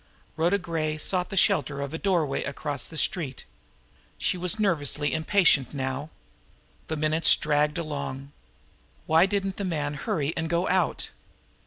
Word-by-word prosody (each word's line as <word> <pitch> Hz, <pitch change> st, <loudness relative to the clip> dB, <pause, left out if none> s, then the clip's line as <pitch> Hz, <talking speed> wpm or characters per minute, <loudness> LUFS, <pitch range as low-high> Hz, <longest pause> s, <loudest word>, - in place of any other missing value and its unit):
Rhoda 170 Hz, +5 st, +2 dB
Gray 160 Hz, -4 st, -2 dB
sought 180 Hz, +3 st, -1 dB
the 195 Hz, -, -5 dB
shelter 145 Hz, -4 st, +2 dB
of 140 Hz, +1 st, -4 dB
a 160 Hz, -, -3 dB
doorway 170 Hz, -8 st, +1 dB
across 140 Hz, 0 st, -3 dB
the 160 Hz, -, -9 dB
street. 150 Hz, -6 st, -1 dB, 0.7 s
She -, -, 0 dB
was 180 Hz, +4 st, 0 dB
nervously 150 Hz, -7 st, +1 dB
impatient 160 Hz, -, +3 dB
now. 135 Hz, +2 st, -3 dB, 0.8 s
The 160 Hz, -, -3 dB
minutes 155 Hz, +2 st, +4 dB
dragged 150 Hz, +1 st, +1 dB
along. 140 Hz, -4 st, -5 dB, 0.7 s
Why 160 Hz, +4 st, +5 dB
didn't 195 Hz, -1 st, -1 dB
'the 200 Hz, -, -2 dB
man 150 Hz, -5 st, -1 dB
hurry 145 Hz, +1 st, -2 dB
and 165 Hz, 0 st, -2 dB
go 170 Hz, +2 st, +1 dB
out? 185 Hz, -2 st, 0 dB
155 Hz, 145 wpm, -26 LUFS, 145-180 Hz, 0.8 s, Why